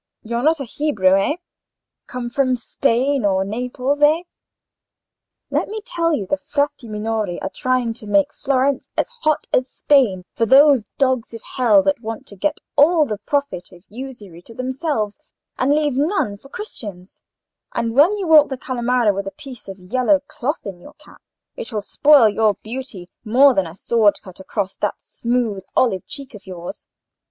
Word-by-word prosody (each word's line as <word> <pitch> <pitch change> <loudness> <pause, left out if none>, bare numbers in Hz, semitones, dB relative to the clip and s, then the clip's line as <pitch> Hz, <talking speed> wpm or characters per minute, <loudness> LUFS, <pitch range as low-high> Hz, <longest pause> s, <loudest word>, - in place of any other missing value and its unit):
You're 235 +2 -2
not 315 +3 +2
a - - -3
Hebrew, 215 -8 +2
eh?—come 250 - -5
from 255 0 +1
Spain 260 +2 0
or 190 -1 +2
Naples, 250 +6 -2
eh? 310 +4 +4 1.3
Let - - 0
me 435 +1 -5
tell 335 -1 0
you 235 -11 -1
the 290 - -1
Frati 285 -2 -2
Minori 215 -3 -2
are 190 - -4
trying 255 -1 0
to 225 -2 -12
make 200 -1 +2
Florence 270 0 0
as - - +1
hot 310 -1 +1
as 255 +1 +2
Spain 225 -11 +2
for 230 - 0
those 275 -2 +6
dogs 260 -4 0
of 225 - -10
hell 220 -6 +3
that 195 +3 0
want 225 -1 -6
to 200 - -11
get 290 +11 -1 0.2
all 305 +2 +5
the 210 -6 -4
profit 280 -6 -2
of 180 +1 -17
usury 215 -8 -9
to 230 +5 -14
themselves 255 -4 -2 0.4
and 260 +2 +2
leave 295 -1 +2
none 290 - 0
for 275 +7 -17
Christians; 205 - -9 0.5
and 230 -1 -2
when 320 - +5
you 395 - -3
walk 310 -3 +6
the 265 - -4
Calimara 245 -3 +1
with 195 0 -4
a - - -4
piece 270 -5 -11
of 195 -1 -8
yellow 255 +10 +1
cloth 285 +1 -4
in 195 -3 -7
your - - -14
cap, - - -19 0.3
it - - -7
will 210 -2 -3
spoil 285 0 +5
your 215 -1 +2
beauty 225 -6 -7 0.2
more 255 +5 +5
than 190 -6 0
a 160 - -10
sword 215 0 +2
cut 185 -1 -13
across 195 0 -3
that 210 - -1
smooth 235 -5 -2
olive 200 -8 +1
cheek 275 -2 -8
of 200 -2 -13
yours. 175 -2 -8
245 Hz, 175 wpm, -20 LUFS, 205-280 Hz, 1.3 s, those